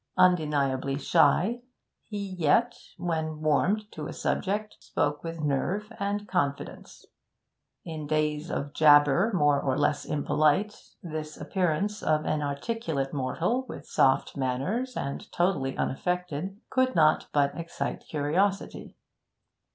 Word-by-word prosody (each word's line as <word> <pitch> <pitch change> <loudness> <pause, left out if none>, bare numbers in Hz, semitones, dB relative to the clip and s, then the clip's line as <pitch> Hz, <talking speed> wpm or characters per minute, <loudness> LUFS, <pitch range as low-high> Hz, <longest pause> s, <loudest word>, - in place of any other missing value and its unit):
Undeniably 145 -7 +2
shy, 170 - +3 0.5
he 210 - -5
yet, 185 +8 +2 0.2
when 160 -3 -2
warmed 155 +8 +2
to 150 -1 -6
a - - -6
subject, 210 +2 -2
spoke 145 0 -2
with 165 0 -5
nerve 185 - -1
and 205 +1 -2
confidence. 140 0 -3 0.8
In 155 -3 -6
days 155 +1 0
of 140 +1 -3
jabber, 145 +6 +5
more 145 -7 +3
or 130 -1 0
less 145 0 +1
impolite, 150 +7 0
this 155 -2 -6
appearance 190 +3 -1
of 155 0 +1
an 155 -1 0
articulate 145 - -2
mortal, 165 - -1
with - - -8
soft 135 0 +2
manners 145 - -2
and 140 - -5
totally 175 -7 0
unaffected, 180 +4 -2
could 255 0 +2
not 155 -1 +4
but 140 -1 +2
excite 170 -1 -4
curiosity. 175 +7 -1
155 Hz, 120 wpm, -27 LUFS, 145-195 Hz, 0.8 s, jabber